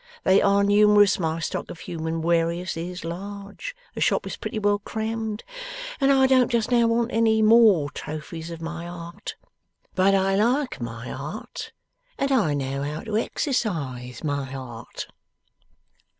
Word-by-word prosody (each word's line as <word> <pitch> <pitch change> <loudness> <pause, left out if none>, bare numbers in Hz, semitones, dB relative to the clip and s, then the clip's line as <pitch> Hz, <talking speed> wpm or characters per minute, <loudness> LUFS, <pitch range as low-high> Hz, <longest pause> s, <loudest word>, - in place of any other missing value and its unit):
They 190 - +5
are 200 0 +4
numerous, 205 0 +5
my 160 -1 -1
stock 165 - -3
of 165 - -9
human 160 -1 -3
warious 170 +1 +1
is 175 +1 -5
large, 200 - -6 0.2
the - - -6
shop - - +2
is - - -4
pretty 230 - -5
well 205 -1 +2
crammed, 220 0 -3 0.6
and 275 -1 +4
I 265 -1 +5
don't 260 -2 +4
just 235 -1 0
now 235 -1 +5
want 230 +1 +1
any 220 -1 +3
more 215 -10 +6
trophies 160 +2 -6
of 165 -1 -7
my 170 +1 -5
art. 170 -1 -7 0.6
But 190 +1 +4
I 195 0 +2
like 245 - +1
my 115 0 -5
art, 150 +10 -6 0.5
and 275 0 0
I 200 - +3
know 135 0 -2
how 150 +2 -3
to 220 -2 -4
exercise 150 - -2
my 140 -3 -2
art. 120 -4 -7
190 Hz, 150 wpm, -25 LUFS, 160-220 Hz, 0.6 s, more